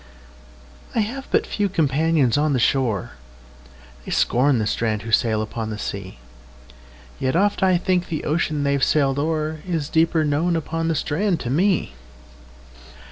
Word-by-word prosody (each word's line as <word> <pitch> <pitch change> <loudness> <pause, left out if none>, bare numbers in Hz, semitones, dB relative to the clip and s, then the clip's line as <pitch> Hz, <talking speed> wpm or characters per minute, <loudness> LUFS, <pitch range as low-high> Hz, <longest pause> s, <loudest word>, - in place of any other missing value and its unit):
I 225 - +3
have 260 +6 -4
but - - +2
few 205 -1 -1
companions 155 - +2
on 150 0 +2
the 130 - +1
shore:They - - -4
scorn 130 +2 +2
the 110 - 0
strand 110 0 -1
who 115 - -6
sail 110 -1 +2
upon 110 0 -5
the 105 - -5
sea; 100 -5 -6 1.0
Yet 130 +3 0
oft 205 +4 +2
I 185 -2 +4
think 180 0 0
the 155 - -4
ocean 155 -1 0
they've 140 -1 +1
sailed 140 -2 +2
o'erIs 155 +1 -2
deeper 160 0 +2
known 155 +4 +1
upon 165 0 -2
the 165 - 0
strand 175 +5 0
to 120 - -3
me. 180 - +1
145 Hz, 145 wpm, -22 LUFS, 115-165 Hz, 1.0 s, I